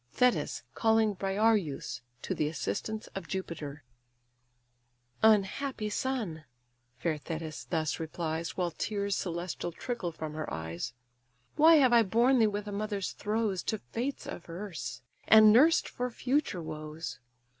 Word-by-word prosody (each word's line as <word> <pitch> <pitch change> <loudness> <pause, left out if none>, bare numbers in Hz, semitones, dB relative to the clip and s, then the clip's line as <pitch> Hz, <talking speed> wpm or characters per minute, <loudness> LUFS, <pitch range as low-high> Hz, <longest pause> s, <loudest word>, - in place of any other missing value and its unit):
THETIS 250 -1 +2
CALLING 220 -1 +3
BRIAREUS 195 - 0 0.2
TO - - -1
THE 150 - 0
ASSISTANCE 155 - -3
OF 195 - -6
JUPITER 155 -6 -5 1.4
"Unhappy 215 +2 +2
son! 210 -11 -2 0.5
(fair 160 +2 -1
Thetis 160 0 -5
thus 160 -3 -1
replies, 160 0 -3
While 175 -2 0
tears 200 +2 -1
celestial 175 0 -3
trickle 190 -1 -4
from 155 -1 -6
her 155 0 -4
eyes) 80 +9 -4 0.6
Why 320 +2 +8
have 260 -5 +5
I 235 - +8
borne 235 +5 +3
thee 220 - +5
with 205 0 -3
a - - -4
mother's 205 -1 -2
throes, 210 -3 -1
To 220 - -1
Fates 245 +6 -4
averse, 165 - -6 0.2
and 215 -1 +9
nursed 305 +8 +5
for 250 0 -3
future 250 - -1
woes? 155 -2 -6
195 Hz, 130 wpm, -30 LUFS, 160-225 Hz, 1.4 s, and